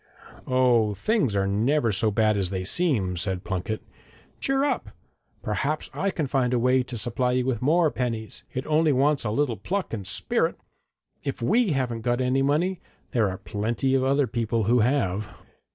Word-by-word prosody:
'Oh, 120 -5 +3
things 165 - +1
are 100 -1 +2
never 115 +5 +1
so 105 +2 +2
bad 110 0 +2
as 95 -3 0
they 95 -1 -3
seem,' 105 - +1
said 95 0 -2
Plunket. 95 +3 -3 0.6
'Cheer 270 0 +1
up. 290 - -1 0.5
Perhaps - - -2
I 200 - 0
can 165 -5 -2
find 130 -2 +1
a - - +3
way 125 +2 +3
to 125 -1 -6
supply 125 +3 0
you 125 0 +1
with 130 -4 -1
more 160 +3 +3
pennies. 115 -3 -3
It 130 - -4
only 155 0 +3
wants 140 +2 +2
a - - 0
little 120 0 0
pluck 185 - -3
and 100 -4 -4
spirit! - - -1 0.6
If 140 - -3
we 205 - +2
haven't 125 -4 -1
got 120 +1 0
any 130 +1 +1
money, 165 +7 +1 0.3
there 110 -5 +2
are 95 - -5
plenty 105 +8 -1
of 135 -1 +3
other 140 +1 +3
people 115 -2 -1
who 120 +4 +3
have.' 105 -5 +1
125 Hz, 180 wpm, -25 LUFS, 105-140 Hz, 0.6 s, Oh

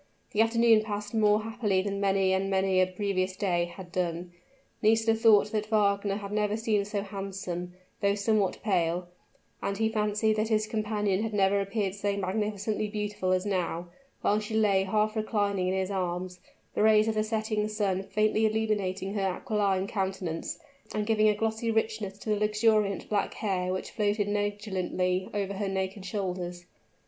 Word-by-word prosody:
The 210 - +2
afternoon 230 -1 +5
passed 210 0 -5
more 215 -1 +3
happily 220 -4 0
than 200 0 -3
many 195 -1 +2
and 190 +1 0
many 190 -1 +2
a 185 - +3
previous 185 -1 -1
day 175 -4 +1
had 175 +1 -10
done; 175 0 -2 0.5
Nisida 225 +1 +4
thought 220 -2 +5
that 215 -1 -1
Fernand 200 -1 +1
had 200 0 -6
never 210 0 0
seemed 215 -3 0
so 205 -1 -2
handsome, 195 -3 -5 0.3
though 200 0 +3
somewhat 205 -2 +1
pale, 175 -3 0 0.5
and 200 - -2
he 220 +1 +2
fancied 215 0 +1
that 215 +1 +1
his 215 -1 +2
companion 210 -2 -1
had 220 -1 -2
never 200 0 +3
appeared 195 -1 -1
so 200 0 -2
magnificently 210 +2 -1
beautiful 210 -2 -2
as 185 +1 +1
now, 175 -3 -2 0.3
while 210 - +2
she 215 +1 -5
lay 200 -3 +3
half 215 +2 +1
reclining 205 -4 0
in 185 - 0
his 190 +1 -1
arms, 180 -1 -3 0.3
the - - 0
rays 215 0 +5
of 225 - +1
the 215 0 +1
setting 215 -1 -1
sun 205 -3 0
faintly 215 +2 +2
illuminating 205 -3 -1
her 205 - -1 0.2
aquiline 200 -5 0
countenance, 190 -5 -3 0.4
and 210 0 0
giving 215 -1 +4
a 210 - +2
glossy 225 +2 -1
richness 220 -3 -1
to 215 - -4
the 210 - +1
luxuriant 210 -2 +2
black 205 -2 -1
hair 185 -3 -1
which 185 - -4
floated 205 -1 0
negligently 195 -3 -1
over 200 -1 -2
her 200 +1 -2
naked 190 +1 -3
shoulders. 180 -3 -4
205 Hz, 170 wpm, -28 LUFS, 190-215 Hz, 0.5 s, afternoon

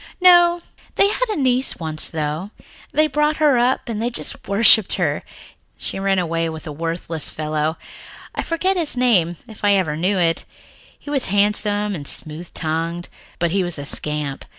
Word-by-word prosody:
"No. 350 -1 +6 0.3
They 400 - +4
had - - -1
a 425 - -1
niece 260 -2 +1
once, 155 -2 -2
though. 155 +4 -3 0.4
They 310 - +3
brought 300 0 +1
her 295 -5 +4
up 250 +2 +1
and 220 -2 -3
they 235 - 0
just 240 - -5
worshipped 210 0 +5
her. - - -1 0.6
She - - -5
ran 195 0 +1
away 165 -2 -1
with 160 -1 -8
a 155 - -6
worthless 165 +1 -3
fellow 155 +1 -2 0.6
I - - -2
forget 370 +3 0
his 315 -7 +2
name, 185 -9 +2
if 220 -2 -14
I 205 0 +4
ever 180 -6 +1
knew 185 +5 0
it. 165 -2 +1 0.5
He 290 - -9
was 275 -3 0
handsome 205 +1 +2
and 145 -6 -6
smooth 160 +3 -4
tongued, 165 +2 -3 0.3
but 170 -1 0
he 195 +1 +1
was 175 -2 -3
a 145 - -6
scamp. 150 -1 -2
195 Hz, 175 wpm, -20 LUFS, 160-250 Hz, 0.6 s, No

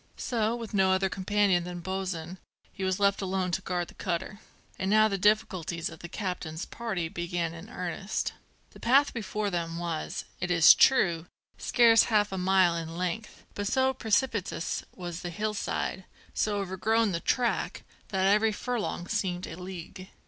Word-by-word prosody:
'So, 225 -2 0
with 230 -2 -7
no 190 -2 +4
other 190 0 +2
companion 195 -1 +2
than 175 0 -6
Bosin, 185 -1 -4 0.3
he 195 - -6
was 190 0 0
left 200 0 +3
alone 190 -1 -1
to 165 - -1
guard 175 -2 -2
the - - -14
cutter. 185 +3 -3 0.4
And 190 - -1
now 215 +1 +6
the 200 - -1
difficulties 190 -5 +1
of 165 - -11
the 175 - -8
captain's 180 -5 -4
party 195 -8 -3
began 170 0 -3
in 170 +5 -10
earnest. 190 -1 -3 0.4
The - - -15
path 275 +4 +4
before 210 -2 -2
them 170 -1 -2
was, 170 0 -3
it 180 - -2
is 170 -2 +8
true, 175 -10 +4 0.3
scarce 230 -3 +5
half 210 -2 +2
a 190 - -3
mile 185 -2 +4
in 165 0 -5
length, 185 +5 -4
but 205 0 -3
so 265 +3 +2
precipitous 220 -7 -1
was 175 -2 -6
the 175 - -4
hillside, 205 0 -2 0.3
so 210 -1 0
overgrown 200 +3 +1
the 170 - -1
track, 245 +6 0 0.2
that 190 -1 0
every 210 +3 +4
furlong 220 -5 -3
seemed 185 -3 -1
a - - -7
league. 185 +1 -8
190 Hz, 165 wpm, -28 LUFS, 175-210 Hz, 0.4 s, is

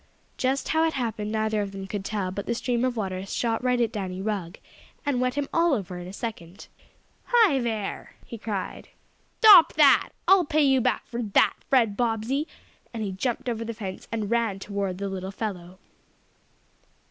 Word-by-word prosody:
Just 265 +2 -1
how 320 0 +2
it 320 - -2
happened 220 -4 -3
neither 220 -1 0
of 200 -1 -5
them 195 0 -6
could 195 0 -5
tell, 195 -3 -2
but 200 +1 -6
the 235 - 0
stream 240 0 -1
of 255 -2 0
water 190 -3 -3
shot 225 +4 -2
right 250 -1 +2
at 230 -2 +1
Danny 190 -4 -4
Rugg, 195 -3 -3 0.5
and 270 -4 0
wet 250 0 0
him 285 -1 -1
all 335 -3 +3
over 185 -5 -5
in 175 - -8
a - - -7
second. 200 -4 -7 0.6
"Hi 440 - +4
there!" 225 -4 -4
he 230 - -9
cried. 205 -3 -5 0.5
"Stop 400 -6 +9
that! 295 -3 +5 0.2
I'll 380 -1 +6
pay 305 -1 +2
you 270 -2 +4
back - - 0
for 240 0 -5
that, 210 -4 +3 0.2
Fred 230 -6 +3
Bobbsey," 240 +6 -1 0.4
and 225 -2 -4
he 200 - -3
jumped 235 +7 -3
over 230 -2 -2
the 230 0 -5
fence 190 -3 -7
and 220 -2 -3
ran 230 -4 +1
toward 195 -2 -3
the 200 +1 -3
little 190 -1 -5
fellow. 185 -3 -6
220 Hz, 185 wpm, -26 LUFS, 195-250 Hz, 0.6 s, Stop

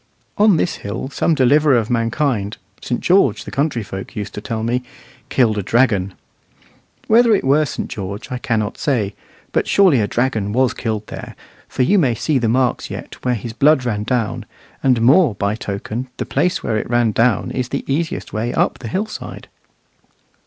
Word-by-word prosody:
On 205 -4 +4
this 175 - -1
hill 100 +6 -5
some 165 +3 +1
deliverer 145 +1 +4
of 115 0 -1
mankind 115 -2 0 0.2
St. 120 - -3
George, 175 - +3
the - - -7
country 140 -4 -1
folk 95 +2 -8
used 105 -2 -5
to 105 - -6
tell 110 0 -4
me 120 +2 0 0.5
killed 110 -5 +2
a - - 0
dragon. 100 -3 +1 0.9
Whether 230 0 +5
it - - -1
were 145 +3 +3
St. - - -4
George, 100 +3 -6
I 125 - -3
cannot 110 -3 -2
say; 110 -8 0 0.4
but - - 0
surely 180 - +4
a 105 - 0
dragon 110 -5 -1
was 130 +1 +2
killed 110 -3 -3
there, - - -8 0.3
for 130 - 0
you 200 +10 +4
may 130 -8 +2
see 140 +4 0
the 115 -2 0
marks 125 +1 +1
yet - - -8
where 125 -1 +1
his 115 +1 -6
blood 140 +1 +3
ran 105 -4 -1
down, 115 -1 -2 0.3
and 125 -4 +2
more 135 - +5
by 100 +1 -1
token 110 +3 -5
the - - -3
place 180 +7 0
where 110 - 0
it 110 - -4
ran 120 -2 +2
down 115 0 +1
is 125 -1 -3
the 140 - -3
easiest 155 +4 -2
way 115 +2 -1
up - - +1
the 120 - -7
hillside. 205 - -5
120 Hz, 185 wpm, -19 LUFS, 110-140 Hz, 0.9 s, Whether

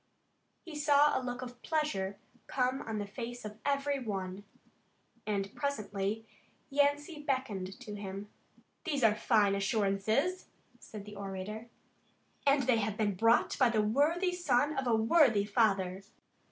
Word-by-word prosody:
He 335 -4 -8
saw 295 0 +4
a - - +1
look 250 0 -4
of 245 -1 -9
pleasure 200 - -1 0.3
come 255 +1 0
on 225 -1 -4
the 205 - -2
face 240 +3 -7
of 210 +1 -8
every 280 0 0
one, 195 -4 -4 0.8
and 200 -2 -1
presently 215 -5 -2 0.5
Yancey 290 +2 +1
beckoned 230 -10 -2
to 210 - -7
him. 200 0 -6 0.6
"These 285 -7 -1
are 220 -2 +6
fine 210 -1 +3
assurances," 215 - 0 0.3
said 210 -2 -9
the 210 0 -10
orator, 200 +3 -6 0.8
"and 275 0 +5
they 245 -2 +3
have 210 -1 -1
been 210 -2 +1
brought 230 +9 +3
by 255 -3 +5
the 220 -2 +2
worthy 305 - +2
son 295 -4 +1
of 265 -1 -1
a 235 - +4
worthy 225 -2 +4
father. 195 -4 +1
225 Hz, 140 wpm, -32 LUFS, 200-280 Hz, 0.8 s, are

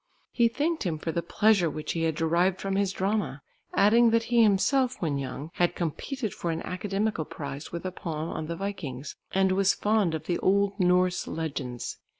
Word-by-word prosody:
He 235 -1 +4
thanked 310 +7 -1
him 170 -6 -1
for 165 +2 -3
the 170 - -1
pleasure 195 0 +3
which 155 0 -4
he 165 -1 -1
had 160 -1 0
derived 170 +4 +2
from 195 0 -2
his 200 -1 +1
drama, 195 -7 -1 0.3
adding 230 +4 +5
that 230 0 +3
he 235 0 +3
himself 240 +5 +3
when 150 -5 -1
young 135 +4 -6
had 175 0 +1
competed 220 - -3
for 170 - -4
an 165 0 -2
academical 195 0 -1
prize 145 -1 -7
with 170 +2 -5
a 185 - -2
poem 160 -3 -4
on 155 - -4
the 170 - -3
Vikings, 165 -9 -5 0.2
and 190 0 +3
was 195 +1 +3
fond 205 -6 +1
of 155 - -5
the 175 - -1
old 200 +1 +2
Norse 180 0 +2
legends. 140 -7 -4
185 Hz, 190 wpm, -27 LUFS, 160-205 Hz, 0.3 s, adding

